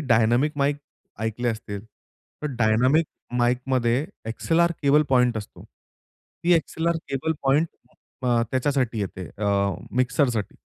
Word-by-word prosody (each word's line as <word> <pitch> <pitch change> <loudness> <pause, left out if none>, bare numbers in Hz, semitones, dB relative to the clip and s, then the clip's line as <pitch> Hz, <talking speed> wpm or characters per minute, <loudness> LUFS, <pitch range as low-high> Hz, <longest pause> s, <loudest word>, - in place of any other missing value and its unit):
Dynamic 120 +2 +3
mic 140 +1 +1 0.4
ऐकले 115 +2 -1
असतील? 110 -3 -4 0.6
तर - - 0
डायनामिक 125 +8 +3 0.3
माइकमध्ये 125 +1 +1 0.2
एक्सएलआर 170 +9 +1
केबल 145 +2 +5
पॉइंट 125 -3 +3
असतो. 105 - -10
ती 175 - -6
एक्सएलआर 165 +1 0
केबल 135 +4 -1
पॉइंट 145 +4 +3 0.5
अ, 120 -2 +2
त्याच्यासाठी 130 -4 0
येते 95 -2 -4
अ, 105 - -2 0.5
मिक्सरसाठी, 125 -4 +1
125 Hz, 110 wpm, -24 LUFS, 115-145 Hz, 0.6 s, केबल